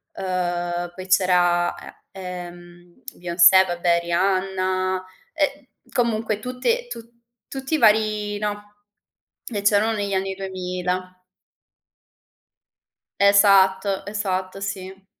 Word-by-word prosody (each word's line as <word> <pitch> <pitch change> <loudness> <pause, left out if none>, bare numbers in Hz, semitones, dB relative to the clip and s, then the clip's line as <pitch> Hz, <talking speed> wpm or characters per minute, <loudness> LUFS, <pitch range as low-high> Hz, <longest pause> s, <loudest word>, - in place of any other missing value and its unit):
ehm, 175 -1 -2
poi 185 0 -8
c'era 175 -2 +3
e - - -11 0.3
ehm, 175 -1 -10
Beyoncé, 175 +1 +5
vabbè 175 -1 +1
Rihanna, 185 +1 0 0.3
e 290 -3 -2 0.2
comunque 220 -3 0
tutte 255 - -2
tu 485 - -7 0.5
tutti 270 +3 -3
i - - +2
vari 215 -3 +2
no, 205 0 -5 0.7
che 210 -4 -4
c'erano 205 +2 +3
negli 200 -2 -3
anni 190 0 -1
2000. 185 -1 -4 2.1
Esatto, 195 -1 +4
esatto, 195 -2 -3
sì. 195 -1 -6
190 Hz, 95 wpm, -22 LUFS, 180-205 Hz, 2.1 s, Beyoncé